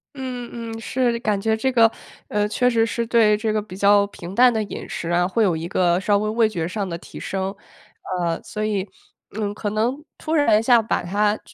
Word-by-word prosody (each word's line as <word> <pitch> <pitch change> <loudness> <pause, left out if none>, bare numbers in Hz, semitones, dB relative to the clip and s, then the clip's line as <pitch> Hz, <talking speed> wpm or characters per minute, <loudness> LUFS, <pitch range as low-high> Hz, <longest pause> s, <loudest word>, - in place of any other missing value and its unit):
嗯 250 -2 -5 0.3
嗯， - - -7
是 245 -1 0
感 210 -4 0
觉 220 +2 +1
这 260 +4 0
个， 230 -2 +5 0.4
呃， 210 0 0
确 250 +4 +2
实 225 -1 +2
是 235 +1 -2
对 220 -3 +4
这 215 0 -1
个 215 - +1
比 190 -3 -10
较 200 0 +5
平 185 -1 -9
淡 250 0 +6
的 220 - 0
饮 210 - -6
食 170 - -4
啊， 175 +1 +2
会 205 +5 0
有 185 -6 +3
一 165 +2 -5
个 175 -1 +2
稍 205 +1 +3
微 215 +1 -1
味 220 0 +2
觉 170 -5 -3
上 195 +1 -3
的 170 -1 -4
提 - - -12
升。 195 +1 -3 0.6
呃， 170 -1 -1
所 215 0 -5
以， 200 -2 -2 0.5
嗯， 205 -1 -1
可 205 0 -3
能 240 +8 -1
突 315 0 -4
然 230 -9 +4
一 - - -1
下 235 -1 +5
把 220 - -1
它 205 +4 +1
215 Hz, 240 characters per minute, -22 LUFS, 195-230 Hz, 0.6 s, 淡